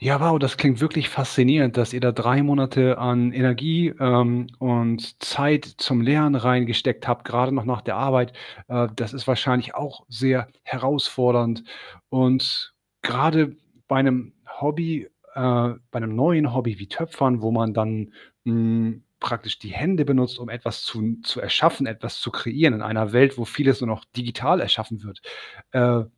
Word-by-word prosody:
Ja, 140 +2 +2
wow, 165 -1 +4
das 135 -2 -1
klingt 135 -3 +3
wirklich 155 -1 +1
faszinierend, 130 -1 +2
dass 120 +1 0
ihr 125 - -3
da 125 -1 +3
3 120 +5 +2
Monate 130 -3 +3
an 125 0 +1
Energie, 135 +7 +1
ähm, 125 -1 +2
und 115 -2 -1
Zeit 145 +1 +1
zum 125 -4 +1
Lernen 145 +3 +4
reingesteckt 125 -1 +1
habt, 120 0 -1
grade 125 +1 0
noch 135 - -1
nach 125 -2 -2
der - - -4
Arbeit. 125 -2 +1 0.3
Äh, 120 -1 0
das 115 +1 -5
ist 135 -2 -7
wahrscheinlich 125 -1 0
auch 145 -2 -7
sehr 130 +1 0 0.2
herausfordernd 125 -3 0 0.5
und 130 - +1 0.3
grade 155 -2 +2 0.3
bei 135 -1 +3
'nem 125 -3 0 0.3
Hobby 155 +2 -2 0.3
äh, 120 -2 +1 0.2
bei 120 - -5
'nem 110 -1 -5
neuen 150 +2 +2
Hobby 120 -5 -2
wie 100 0 -12
Töpfern, 135 - -1
wo 110 - -1
man 115 -1 0
dann, 110 -1 -3 0.3
hm, 115 0 0 0.2
praktisch 115 -3 -4
die 105 - -13
Hände 160 - 0
benutzt, 125 -3 +1
um 120 -2 -10
etwas 115 -2 -6
zu 115 - -5
n 115 +1 -3
zu - - -2
erschaffen, - - +2
etwas - - -7
zu - - -4
kreieren 140 +4 +2
in 105 - -5
einer 110 0 -2
Welt, 135 +1 +5
wo 115 - -4
vieles 135 +2 +1
nur 125 - -2
noch 110 0 -5
digital 125 +8 0
erschaffen 110 -5 -1
wird. 100 -3 -14 0.5
Äh, 120 -2 +3
125 Hz, 165 wpm, -22 LUFS, 115-135 Hz, 0.5 s, Welt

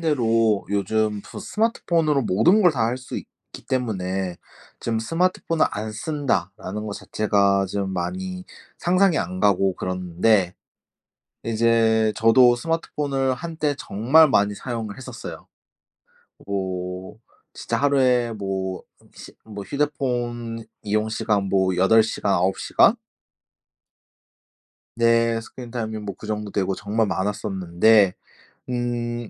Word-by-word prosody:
대로 115 -9 +2
요즘 105 +1 0
저 - - -9
스마트폰으로 165 - 0
모든 115 - +4
걸 175 -3 +5
다 115 -5 0
할 125 +2 -2
수 130 - -7
있기 - - -11
때문에 95 -7 -2 0.4
좀 115 -1 -1
스마트폰을 165 +5 +1
안 110 +1 -5
쓴다라는 105 - -3
거 105 - -4
자체가 100 -2 +1
좀 100 0 -3
많이 185 - -4 0.3
상상이 180 -1 +3
안 90 +2 -3
가고 95 -2 +3
그러는데 90 +1 +1 0.9
이제 115 -1 +2
저도 120 +2 +5
스마트폰을 140 -2 -1
한때 155 -1 -2
정말 135 +11 +4
많이 105 -4 +2
사용을 110 -2 -5
했었어요. 130 -3 -9 1.0
뭐 95 -1 -4 0.3
진짜 - - -3
하루에 130 -4 +2
뭐 95 -3 -4 0.3
시 - - -12
뭐 105 -2 -8
휴대폰 120 -5 -2 0.2
이용 105 +1 0
시간 110 -2 0
뭐 95 -1 +1
8 110 +5 +5
시간, 105 -2 -1
9 95 +2 +1
시간? 225 - +4 2.0
네. 115 0 +3
스크린 120 +1 -10
타임이 110 -3 -4
뭐 105 -2 -6
그 105 - -9
정도 105 -1 -3
되고 95 -1 -1
정말 105 +4 -1
많았었는데 95 0 +2 0.6
음. 120 -1 -3
110 Hz, 235 characters per minute, -23 LUFS, 100-125 Hz, 2.0 s, 걸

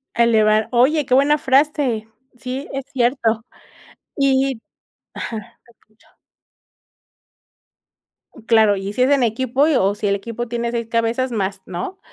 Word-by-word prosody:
A 235 - +4
elevar. 215 -1 +3
Oye, 270 +5 +3
qué 250 - -1
buena 285 +3 +4
frase. 265 -5 +1 0.3
Sí, 260 +2 -6
es 270 0 -4
cierto. 235 -3 +1 0.7
Y 270 -2 +1 0.5
ajá, 225 - -5 0.3
te 235 - -21
escucho. 215 -1 -31 2.4
Claro. 220 -3 +4
Y 195 +1 -5
si 250 - -2
es 260 - +2
en 275 -3 +3
equipo, 260 +5 +1
y 315 - +2
o 200 -3 +2
si 210 - -3
el 200 - +2
equipo 230 +4 -5
tiene 235 0 -3
6 235 -1 -3
cabezas 230 +3 -1
más, 195 -3 -3
¿no? 185 - -6
235 Hz, 145 wpm, -20 LUFS, 220-265 Hz, 2.4 s, A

